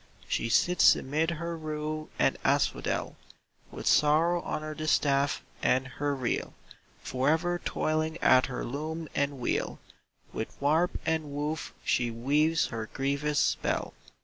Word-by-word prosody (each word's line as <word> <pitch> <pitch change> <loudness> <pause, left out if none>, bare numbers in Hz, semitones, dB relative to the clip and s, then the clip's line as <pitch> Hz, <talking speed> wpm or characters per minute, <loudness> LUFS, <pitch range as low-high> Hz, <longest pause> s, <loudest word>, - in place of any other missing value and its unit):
She 115 - -1
sits 180 +9 +5
amid 155 +4 -1
her 170 0 -3
rue 155 -1 -4
and - - +3
asphodel - - 0 0.5
With - - -8
sorrow 165 +4 +4
on 155 - -4
her 155 0 -4
distaff 145 -2 +1 0.2
and 130 0 +2
her 145 +2 -2
reel; 130 -3 -2 0.5
Forever 160 +7 0
toiling 155 +1 -1
at 130 -5 +5
her 125 -2 -4
loom 155 +5 -4
and 140 0 0
wheel 120 - -1 0.6
With 110 - -5
warp 155 +5 +2
and 160 -1 0
woof 150 +2 -3
she 120 -1 +1
weaves 145 +8 +2
her 110 -1 -5
grievous 140 +2 -1
spell. - - 0
150 Hz, 130 wpm, -29 LUFS, 135-160 Hz, 0.6 s, sits